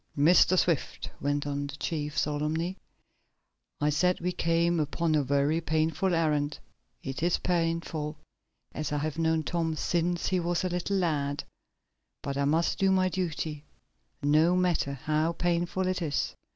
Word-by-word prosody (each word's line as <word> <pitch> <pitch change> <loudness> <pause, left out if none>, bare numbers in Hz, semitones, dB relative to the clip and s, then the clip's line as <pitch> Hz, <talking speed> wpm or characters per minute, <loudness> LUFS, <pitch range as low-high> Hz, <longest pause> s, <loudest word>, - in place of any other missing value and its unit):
"Mr. 175 +5 +5
Swift," 170 -4 0
went 145 0 0
on 145 0 -2
the 145 - -7
chief, 150 -1 -3
solemnly, 155 +4 -1 1.0
"I 150 +1 +2
said 180 +5 +2
we 180 +1 -1
came 170 0 +1
upon 155 +2 0
a 150 - +3
very 140 +4 +1
painful 160 +3 +1
errand. 150 -3 +1 0.5
It 135 +1 -5
is 170 +1 +2
painful, 165 -3 -1 0.5
as 150 -1 -4
I 150 - 0
have 155 +2 -3
known 160 -1 +2
Tom 165 0 -1
since 175 +2 0
he 185 - +1
was 175 0 0
a 185 - 0
little 180 +3 -1
lad. 145 -6 0 0.8
But 140 - -3
I 140 0 +1
must 160 +4 +1
do 195 - +3
my 185 -1 +3
duty, 160 -5 -3 0.6
no 155 +5 +4
matter 180 -6 +1
how 155 +4 0
painful 175 +2 0
it 185 0 -1
is. 145 -4 -1
160 Hz, 150 wpm, -28 LUFS, 150-175 Hz, 1.0 s, Mr